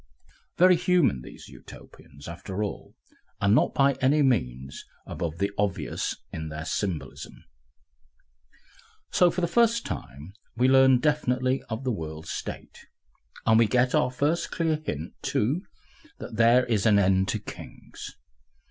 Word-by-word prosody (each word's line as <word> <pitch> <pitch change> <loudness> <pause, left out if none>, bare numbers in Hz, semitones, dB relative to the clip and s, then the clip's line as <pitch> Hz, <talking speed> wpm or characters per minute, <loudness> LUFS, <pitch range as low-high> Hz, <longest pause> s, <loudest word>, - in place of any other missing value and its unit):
Very 180 0 +6
human 175 - +2
these - - -12
Utopians, 70 +1 -14
after 95 +4 -5
all, 105 - -6 0.4
and 100 +1 +3
not 120 - +2
by 140 0 +4
any 145 +3 +3
means 65 - -1 0.2
above 85 -1 -5
the 100 +2 -1
obvious 100 -6 -2 0.2
in 80 0 -5
their 75 +1 -6
symbolism! 75 -9 -4 1.7
So 180 - +4
for 180 - -3
the 170 - +1
first 235 +4 +2
time 75 +7 -7 0.2
we 125 +2 +3
learn 130 0 +6
definitely 130 -2 0
of 110 +3 -4
the 130 - 0
World 80 -5 -6
State, - - -7 0.6
and 110 0 +5
we 115 - +5
get 125 +3 +2
our 125 - +3
first 145 +7 -1
clear 160 -2 -1
hint, 75 - -5
too, 135 - 0 0.6
that - - -8
there 115 +3 +5
is 110 -3 +1
an 105 -2 +5
end 95 -1 +3
to - - -1
Kings. - - -11
115 Hz, 140 wpm, -26 LUFS, 85-140 Hz, 1.7 s, Very